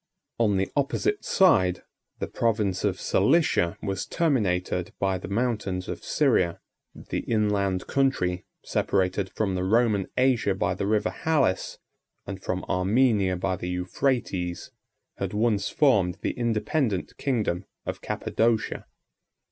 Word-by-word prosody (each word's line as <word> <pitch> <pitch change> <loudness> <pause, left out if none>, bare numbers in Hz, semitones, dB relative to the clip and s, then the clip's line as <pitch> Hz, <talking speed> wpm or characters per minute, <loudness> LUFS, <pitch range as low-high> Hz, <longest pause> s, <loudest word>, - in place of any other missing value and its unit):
On 105 -4 +3
the 95 - -1
opposite 160 - 0
side, 95 - +3 0.3
the - - -2
province 105 -5 0
of 95 -3 0
Cilicia 105 - +2
was 95 -2 -3
terminated 90 - 0
by 95 -1 0
the - - -7
mountains 100 -3 -1
of - - -6
Syria: 85 -2 +2 0.4
the - - -4
inland 100 -4 0
country, 110 -11 0 0.2
separated 95 0 0
from 100 -2 -1
the 90 0 -1
Roman 105 -1 +2
Asia 125 -6 +2
by - - 0
the 100 - -3
River 105 0 +1
Halys, 145 -12 0 0.5
and 95 0 -6
from 95 -1 -3
Armenia 100 0 +2
by 95 +1 -1
the 90 0 -5
Euphrates, 90 -1 -2 0.5
had - - -3
once 105 -2 +1
formed 100 - +3
the - - +1
independent 115 -2 -1
kingdom 105 - -1 0.2
of - - -4
Cappadocia. 115 -1 -1
100 Hz, 125 wpm, -26 LUFS, 95-120 Hz, 0.5 s, On